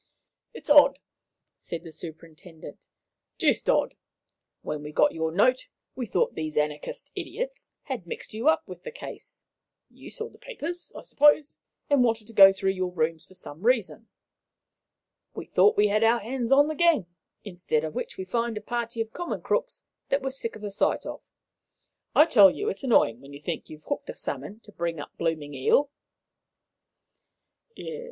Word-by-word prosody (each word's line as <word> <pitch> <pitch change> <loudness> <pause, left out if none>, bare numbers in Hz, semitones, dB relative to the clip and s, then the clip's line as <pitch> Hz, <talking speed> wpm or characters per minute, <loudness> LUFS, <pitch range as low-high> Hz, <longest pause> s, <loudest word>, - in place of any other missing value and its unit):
"It's - - -5
odd," 285 -1 +7 0.6
said 170 -1 -7
the 165 - -10
superintendent, 160 0 -11 0.5
"deuced - - +2
odd. - - +2 0.7
When 150 -1 -4
we 150 0 -7
got - - +3
your 160 0 -2
note, 250 +9 +2 0.3
we 250 -3 -4
thought 180 - +1
these 155 -1 -5
anarchist 150 0 -3
idiots - - -6
had - - -6
mixed 470 - -7
you 225 +6 -2
up 315 - +3
with - - -10
the - - -7
case - - -11 0.5
you - - -12
saw 450 - -5
the - - -19
papers, 355 -9 -6
I - - -8
suppose 295 0 +3 0.3
and 285 -3 +4
wanted 225 -2 0
to 230 - -14
go 195 -2 +9
through 195 0 0
your 185 -1 -3
rooms 165 0 -2
for 190 - -18
some 160 -3 -11
reason. 230 -1 0 1.3
We - - -6
thought 425 - +4
we 210 0 +4
had 215 +2 +2
our 230 +1 +4
hands 240 +2 -3
on 285 +2 +6
the 310 - -2
gang, 325 - +3 0.4
instead 175 -6 -2
of 155 -1 -4
which - - -5
we 190 - -5
find 230 +3 -1
a - - -5
party 235 -1 -3
of 225 0 -5
common 350 -1 -4
crooks - - -2 0.2
that 275 0 +1
we're 265 - -2
sick 245 -3 -5
of 215 - -11
the 205 - -4
sight 195 - 0
of. - - -6 0.9
I 305 - +8
tell 210 -12 +7
you, 410 - -4
sir, - - +1
it's - - -9
annoying 125 - +3
when 140 +1 -13
you 140 - -9
think 160 +2 -5
you've 155 0 -11
hooked 285 - -4
a - - -5
salmon, 215 - -6
to 210 - -15
bring 170 -4 -3
up 145 - -8
a - - -46
blooming 155 -3 -2
eel." 270 - +2
215 Hz, 180 wpm, -26 LUFS, 165-275 Hz, 1.3 s, go